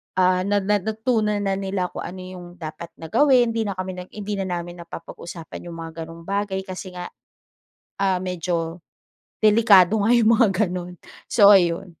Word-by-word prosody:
ah, 185 0 +2
na 205 -1 +1
na 205 +1 +2
natunan 220 0 0
na 195 -1 -1
nila 190 -2 -2
kung - - -6
ano 185 0 -8
yung 185 -1 -9
dapat 160 0 -7
na 160 -1 -10
gawin, 255 -5 +4
hindi 225 -2 -1
na 200 - -3
kami 185 0 -5
nag 180 - -9
hindi 205 -1 -4
na 190 - -2
namin 175 -1 -5
napapag-usapan 170 0 -9
yung 170 - -7
mga 165 0 -7
gano'ng 165 0 -11
bagay 195 +1 -2
kasi 185 -1 -8
nga, 180 0 -6 0.9
ah, 190 -2 +2
medyo 175 -2 -3 0.6
delikado 215 -2 +6
nga 230 - +4
yung 230 -2 +5
mga 225 - +5 0.2
gano'n. 180 0 -5 0.3
So, 205 -4 +5
ayun. 190 -2 +4
185 Hz, 175 wpm, -23 LUFS, 175-205 Hz, 0.9 s, delikado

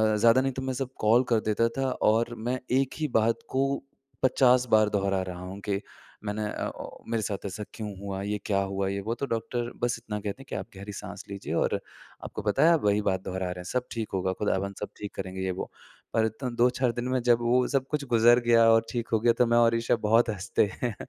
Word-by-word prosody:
ज़्यादा 115 +4 +5
नहीं 135 - 0
तो 130 - -4
मैं 130 0 -2
सब 130 0 -3
कॉल 115 +4 +4
कर 115 -2 +4
देता 115 +2 +3
था 135 -1 +1 0.2
और 115 +2 +1
मैं 125 +3 -2 0.2
1 135 -1 -1
ही 155 - 0
बात 115 +1 +1
को 135 +1 +1 0.6
50 125 -1 +4
बार 110 -1 +5
दोहरा 100 -2 0
रहा 90 -1 -6
हूँ 95 +2 -7
कि 100 0 0 0.4
मैंने 105 +1 -2
अ, - - -3
ओ - - -9
मेरे 115 -2 0
साथ 100 -1 -4
ऐसा 100 +2 -4
क्यों 110 -2 -5
हुआ? 100 -1 -4
ये 105 +1 -1
क्या 100 -2 +1
हुआ? 95 0 -2
ये 100 0 -2
वो 115 - 0
तो 140 - -3
डॉक्टर 120 +1 -2
बस 120 -1 +1
इतना 105 -2 -5
कहते 105 +5 -5
हैं - - -12
कि - - -4
आप - - -4
गहरी 100 +2 -7
साँस - - -7
लीजिए 100 -1 -5
और - - +1 0.5
आपको - - -6
पता 105 +7 +2
है 170 - +7
आप 165 - +2 0.2
बात 95 -1 +1
दोहरा 95 0 -3
रहे 90 - -3
हैं, - - -6
सब 125 +7 -2
ठीक 115 -2 -3
होगा 95 0 0
खुदावन 100 -1 0
सब 105 - -4
ठीक 105 -1 -7
करेंगे 95 0 -5
ये 95 - -1
वो, 90 - -5 0.4
पर 110 - +3
इतना 110 +4 -3
2-4 125 0 +3
दिन 120 +1 -3
में 130 - +1
जब 120 -1 +4
वो 125 +1 +3
सब 135 -1 0
कुछ 150 -2 -1
गुज़र 120 +1 +6
गया 115 -1 +6
और 115 0 +4
ठीक 120 -1 -2
हो 110 - +4
गया 115 +1 +4
तो 125 - +6
मैं 120 0 +3
और 115 -1 +5
ईशा 115 +1 +1
बहुत 115 +2 +4
हँसते 100 0 +1 0.2
हैं 120 -5 -1
115 Hz, 240 wpm, -27 LUFS, 100-120 Hz, 0.6 s, है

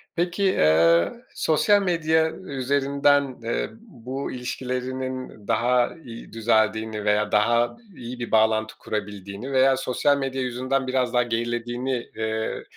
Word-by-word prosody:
Peki, 175 +3 -1
eee, 85 - +4 0.2
sosyal 200 +6 +3
medya 160 -3 +2
üzerinden, 140 -2 +1
eee, 115 - -1
bu 135 - -6
ilişkilerinin 130 -2 -5
daha 125 +2 +2
iyi 115 -2 -10
düzeldiğini 110 -1 +1
veya 105 0 +2
daha 120 - +2 0.2
iyi 120 +1 -8
bir 120 - -5
bağlantı 110 0 +2
kurabildiğini 105 +3 -5
veya 130 0 +4
sosyal 135 +2 +1
medya 135 -1 -2
yüzünden 130 +2 -1
biraz 130 -2 0
daha 125 0 +4
gerilediğini, 120 +2 -2
eee, 110 0 -2
125 Hz, 120 wpm, -24 LUFS, 110-135 Hz, 0.2 s, eee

